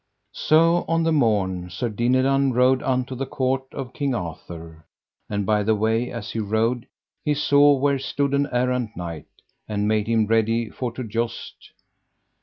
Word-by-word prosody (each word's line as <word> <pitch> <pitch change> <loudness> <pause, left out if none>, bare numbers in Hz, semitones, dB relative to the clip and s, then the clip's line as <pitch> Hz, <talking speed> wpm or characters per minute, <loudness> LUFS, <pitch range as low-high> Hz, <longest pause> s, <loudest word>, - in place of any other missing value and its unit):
So 165 +2 +3
on 165 0 +1
the 165 - +2
morn 100 - +1
Sir 90 +8 -3
Dinadan 130 +4 +2
rode 125 +1 +3
unto 130 0 -1
the 130 +1 -4
court 130 -1 -2
of 130 -2 -7
King 140 -3 -1
Arthur; 80 -3 -7 0.5
and 105 -1 -2
by 105 +1 +2
the 110 +2 +2
way 110 +3 0
as 115 -3 -6
he 115 - -3
rode 110 +3 0 0.4
he 150 -1 +1
saw 145 0 +5
where 140 0 +1
stood 140 +1 -1
an 140 +1 +1
errant 125 -3 -1
knight, 85 -3 -6 0.4
and 105 -1 -1
made 105 -1 +1
him 115 -1 +2
ready 115 0 +1
for 125 -2 -4
to 130 - -5
joust. 115 +1 -5
120 Hz, 165 wpm, -23 LUFS, 105-135 Hz, 0.5 s, saw